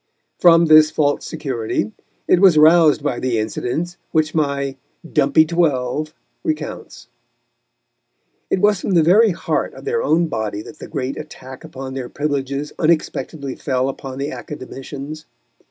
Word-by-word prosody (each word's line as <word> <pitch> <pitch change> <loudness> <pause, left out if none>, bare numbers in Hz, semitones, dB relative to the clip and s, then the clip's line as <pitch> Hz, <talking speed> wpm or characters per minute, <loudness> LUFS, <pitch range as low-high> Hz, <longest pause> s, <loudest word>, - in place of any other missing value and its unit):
From 170 -1 +6
this 155 -1 +7
false 145 -2 0
security 120 -9 -3 0.4
it 180 - +4
was 185 -5 +6
roused 155 -1 +5
by 135 -5 -1
the 125 -3 -1
incident 125 +10 -3
which 155 0 +1
my 140 -3 -1 0.3
"dumpy 150 0 +3
twelve" 155 -3 0 0.3
recounts. 310 -1 -5 1.4
It - - +1
was 205 -2 +3
from 190 - -1
the 165 - +5
very 210 +7 +5
heart 175 -2 -2
of - - -12
their 460 +2 0
own 170 +2 +2
body 110 -7 -3
that 155 - -13
the - - -8
great 130 0 -4
attack 130 -4 -10
upon 130 0 -8
their 130 -2 -5
privileges 145 0 -3
unexpectedly 155 -3 -1
fell 130 -1 -1
upon 135 -1 -7
the 140 +1 -3
Academicians. 140 +4 -8
150 Hz, 140 wpm, -19 LUFS, 130-160 Hz, 1.4 s, this